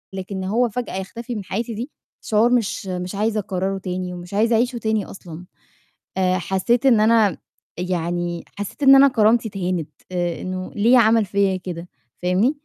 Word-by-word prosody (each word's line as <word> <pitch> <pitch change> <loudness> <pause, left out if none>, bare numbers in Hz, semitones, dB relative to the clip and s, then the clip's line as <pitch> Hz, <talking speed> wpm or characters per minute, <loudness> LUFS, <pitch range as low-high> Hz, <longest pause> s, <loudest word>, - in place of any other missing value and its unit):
لكن 190 +1 -5
إن 190 - -3
هو 230 +5 +1
فجأة 240 -3 -4
يختفي 230 +5 -6
من 205 - -4
حياتي 225 +5 -3
دي 240 +7 -5 0.3
شعور 220 +2 +2
مش 225 -4 0
مش 180 +1 -4
عايزة 215 +1 0
أكرّره 195 0 -2
تاني 180 -1 -4
ومش 175 +2 -9
عايزة 225 +3 +3
أعيشه 240 +2 +1
تاني 220 -2 -1
أصلًا. 175 -2 -10 0.7
آآ، 185 -1 +2
حسّيت 195 +8 0
إن 235 -5 +5
أنا 215 -4 +4 0.4
يعني 175 -1 -2
حسّيت 205 +8 -5
إن 270 0 +9
أنا 275 +1 +8
كرامتي 225 -1 +3
اتهانت، 180 -5 -3 0.2
آآ، 175 -2 -2
إنه 185 0 -5
ليه 235 +5 +5
عَمَل 225 -1 +4
فيّا 195 -1 +1
كده، 175 -1 -7 0.3
فاهمني؟ 185 +9 +3
200 Hz, 170 wpm, -21 LUFS, 185-230 Hz, 0.7 s, إن